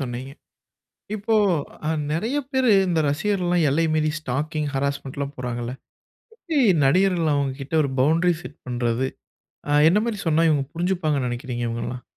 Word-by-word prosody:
சொன்னீங்க. 130 +1 -5 0.8
இப்போ 220 +2 0 0.5
அ - - +1 0.2
நிறைய 225 - -1
பேரு 260 -2 +2 0.2
இந்த 170 -2 +1
ரசிகர்கள்லாம் 175 +1 +1
எல்லை 165 +4 +2
மீறி 155 -1 +1
ஸ்டாக்கிங், 150 +2 -2
ஹராஸ்மென்ட்ல்லாம் 140 0 -3
போறாங்கல்ல. 120 0 -4 0.6
எப்பிடி 325 -9 -2 0.3
நடிகர்கள் 175 +1 +3
அவுங்கக்கிட்ட 140 +1 -2
ஒரு 140 - -1
பவுண்டரி 165 +6 +3
செட் 145 - -10
பண்றது? 120 +1 0 0.6
ஆ, - - 0 0.2
என்னமாரி 210 +3 +1
சொன்னா 160 +1 +3
இவுங்க 145 -3 +2
புரிஞ்சிப்பாங்கன்னு 165 -6 0
நெனைக்கிறீங்க? 120 0 -4
இவுங்கள்லாம். 120 +2 -4
150 Hz, 130 wpm, -23 LUFS, 130-175 Hz, 0.8 s, நடிகர்கள்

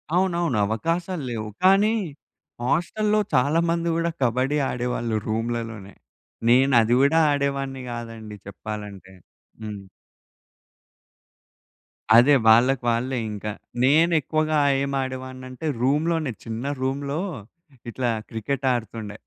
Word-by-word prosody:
అవునవును. 175 - +1
అవకాశాలు 165 - -2
లేవు. 110 -2 -4
కానీ 195 +4 +5 0.7
హాస్టల్లో 210 - +1
చాలా 140 +6 +3
మంది 170 0 0
గూడా 170 0 0
కబడ్డీ 130 +4 +1
ఆడేవాళ్ళు. 120 -2 -2
రూములలోనే. 115 -2 -3 0.6
నేనది 120 -2 +4
కూడా 140 +4 +4
ఆడేవాడిని 140 -2 -2
గాదండి 115 -2 -7
చెప్పాలంటే. 100 -1 -8 0.5
హ్మ్. 105 -2 -6 2.3
అదే 135 +5 +6
వాళ్ళకి 120 +3 +5
వాళ్ళే 125 +3 0
ఇంక. 105 0 -8 0.4
నేనెక్కువగా 155 +1 +3 0.2
ఏం 140 - -2
ఆడేవాడినంటే 130 +2 -6
రూమ్‌లోనే 150 0 +1
చిన్న 115 +3 -5 0.2
రూమ్‌లో 140 +3 -2 0.7
ఇట్లా 120 -1 -1 0.2
క్రికెట్ 135 +5 -2
ఆడుతుండే. 110 -2 -5
130 Hz, 95 wpm, -24 LUFS, 115-155 Hz, 2.3 s, అదే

